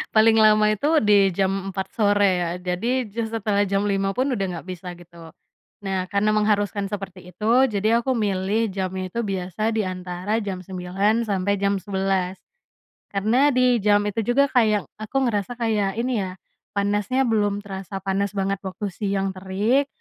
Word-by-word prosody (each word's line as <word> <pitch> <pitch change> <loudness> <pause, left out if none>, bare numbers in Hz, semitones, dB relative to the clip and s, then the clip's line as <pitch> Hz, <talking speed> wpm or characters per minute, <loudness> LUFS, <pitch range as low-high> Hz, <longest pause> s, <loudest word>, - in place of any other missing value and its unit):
paling 220 +1 +6
lama 215 0 +5
itu 215 +8 -1 0.2
di 210 - +6 0.2
jam 195 0 0
4.00 190 0 -4
sore 205 -2 +3 0.2
ya 175 - 0
jadi 205 +9 -1
ja 230 - -2
setelah 210 -2 0
jam 195 +1 +1
5 195 -1 0
pun 255 - +2
udah 195 -5 -1
enggak 175 -1 -6
bisa 185 0 -7
gitu. 170 -1 -14 0.6
Nah 190 -1 -1
karena 200 +1 +2
mengharuskan 205 -1 +1
seperti 190 -3 -7
itu 210 - -5 0.3
jadi 215 +3 +2
aku 260 - -1
milih 205 +1 0
jamnya 185 -1 -3
itu 235 - -2
biasa 185 +1 -5 0.2
di - - +3
antara 185 +3 -3
jam 195 -3 -4
9.00 195 +5 0
sampai 200 0 +1
jam 200 0 +2
11.00. 190 -1 -1 0.8
Karena 230 +9 +3
di 250 -1 +4
jam 205 -1 +4
itu 210 +2 -2
juga 280 +1 +3
kayak 215 -5 +3 0.2
aku 215 +4 -6
ngerasa 205 +2 -2
kayak 210 -4 0
ini 245 -1 0
ya, 185 - -4 0.4
panasnya 205 +5 +1
belum 205 -3 +1
terasa 195 -1 -7
panas 195 +1 -1
banget 195 0 -1
waktu 205 +3 -4
siang 195 0 -2
terik. 205 +9 +1
200 Hz, 165 wpm, -23 LUFS, 190-215 Hz, 0.8 s, paling